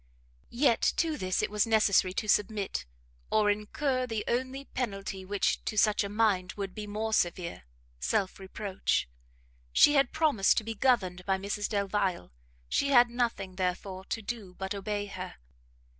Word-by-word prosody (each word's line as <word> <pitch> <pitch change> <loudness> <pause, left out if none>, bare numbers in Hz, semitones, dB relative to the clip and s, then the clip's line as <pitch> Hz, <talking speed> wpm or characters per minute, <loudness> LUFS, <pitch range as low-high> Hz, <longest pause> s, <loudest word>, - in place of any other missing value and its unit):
Yet 240 -1 +2 0.2
to 325 -2 +1
this 185 -7 -1
it - - -1
was 210 +1 +2
necessary 210 -4 +4
to 215 - -2
submit, 205 - 0 0.4
or 210 -1 +3
incur 255 +5 -1
the 225 -3 -2
only 260 +3 -2
penalty 195 -7 -4
which, 200 +1 0
to 215 - -3
such 215 0 +4
a 200 - -4
mind, 205 -4 +1
would 195 -2 -5
be 210 -1 -6
more 220 +2 -2
severe, 175 - -1 0.3
self 185 - -1
reproach: 190 - -2 0.6
she 290 - +6
had 275 -3 +3
promised 285 -12 +3
to - - +2
be 225 +1 -4
governed 200 -7 +1
by 190 -1 +2
Mrs 200 +2 -3
Delvile, 200 - -1 0.4
she 280 - +1
had 245 -3 +6
nothing, 230 -6 -2
therefore, 185 +1 -2
to 225 - -4
do 200 -4 -6
but 190 +2 -4
obey 205 +1 -3
her. 185 -2 -7
205 Hz, 160 wpm, -29 LUFS, 190-230 Hz, 0.6 s, she